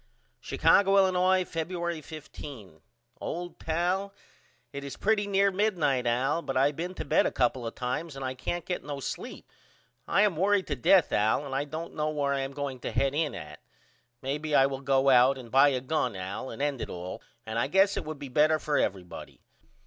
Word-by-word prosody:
Chicago, 200 0 +3
Illinois, 185 -1 +4
Febuery 170 -1 -4
15. 135 - -10 0.4
OLD 175 +1 -5
PAL: 180 +5 -1 0.6
It 140 0 -5
is 140 - -7
pretty 210 -1 +1
near 200 0 +3
midnight 170 - +1
Al 130 +7 +1
but 135 -5 -3
I 140 +2 +4
been 175 +5 -5
to - - -5
bed - - +3
a - - -2
couple 125 -1 0
of 115 - -7
times 135 +5 -3
and 135 -1 -5
I 130 - -2
can't 170 +6 -4
get 180 - -3
no 145 -1 -5
sleep. - - -7 0.6
I 200 - +3
am 200 -7 +1
worried 195 +1 +2
to 145 - -2
death 160 +7 +4
Al 110 +7 +2
and 135 - -6
I 140 +2 0
don't 160 +3 -6
know 155 0 -1
where 145 -2 0
I 140 - -1
am 135 0 -4
going 140 -2 -4
to - - -4
head 135 0 +1
in 150 0 -1
at. 75 0 -9 0.6
Maybe 150 +3 -1
I 135 - +6
will 135 -1 -3
go 135 0 +3
out 130 +2 +5
and 120 -3 -11
buy 135 +2 +6
a 130 -2 -1
gun 130 -5 -1
Al 95 +7 -5
and 140 - -5
end 145 -4 -1
it - - -4
all 90 +1 -6 0.2
and 110 +1 -2
I 120 - +1
guess 195 +6 +3
it - - -2
would 155 -1 -6
be 140 - -7
better 150 +4 +3
for 150 -1 0
everybody. 95 -3 -4
145 Hz, 205 wpm, -28 LUFS, 130-175 Hz, 0.6 s, I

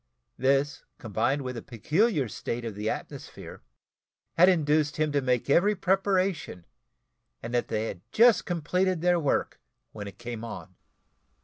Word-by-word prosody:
This, 135 +3 +1
combined 120 +3 -1
with 125 0 -4
the 115 - -6
peculiar 150 - 0
state 115 +2 -5
of 115 - -4
the 105 +2 -3
atmosphere, - - -7 0.7
had 180 +3 +6
induced 150 -3 +2
him 155 -1 +1
to 145 -1 +1
make 125 -2 0
every 195 +9 +4
preparation, 190 - 0 0.8
and 120 - -6
that 120 - +1
they 110 0 -1
had 90 - -6
just 235 0 +5
completed 180 +1 0
their 175 0 +3
work 145 -4 -1 0.3
when 105 -1 -7
it 100 -1 -10
came 120 -1 -6
on. 105 -4 -8
145 Hz, 145 wpm, -27 LUFS, 115-180 Hz, 0.8 s, had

